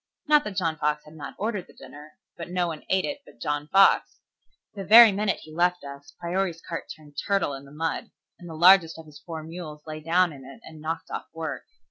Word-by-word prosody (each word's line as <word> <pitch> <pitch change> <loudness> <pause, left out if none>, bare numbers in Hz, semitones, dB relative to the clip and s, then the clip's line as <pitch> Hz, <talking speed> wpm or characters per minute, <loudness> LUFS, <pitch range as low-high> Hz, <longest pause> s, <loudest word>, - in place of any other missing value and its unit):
Not 300 -1 +4
that 210 -2 -5
John 165 -4 0
Fox 150 0 -1
had 150 - -14
not 155 -2 -9
ordered 205 -2 -3
the - - -19
dinner, 150 +1 -13 0.2
but 170 - -8
no 180 0 0
one 160 -3 -5
ate 190 0 +2
it 290 0 -4
but - - -19
John 145 +3 -2
Fox. 195 +4 +4 0.5
The 200 -2 -6
very 225 +3 +9
minute 200 +1 -1
he 155 - -13
left 180 +2 +1
us 140 0 -10
Priory's 175 0 -2
cart 165 0 -6
turned 145 -2 -18
turtle 195 -7 +1
in 135 0 -8
the 140 - -15
mud, 160 +1 -3 0.3
and 175 - -11
the 160 - -8
largest 175 -1 +6
of 160 - -11
his 150 -2 -14
four 160 -2 -7
mules 160 -2 -9
lay 155 -1 -6
down 170 +2 +2
in 135 -2 -12
it 135 +1 -12
and 160 -1 -12
knocked 165 +1 -5
off - - -5
work. 160 -2 -5
165 Hz, 225 wpm, -25 LUFS, 150-185 Hz, 0.5 s, very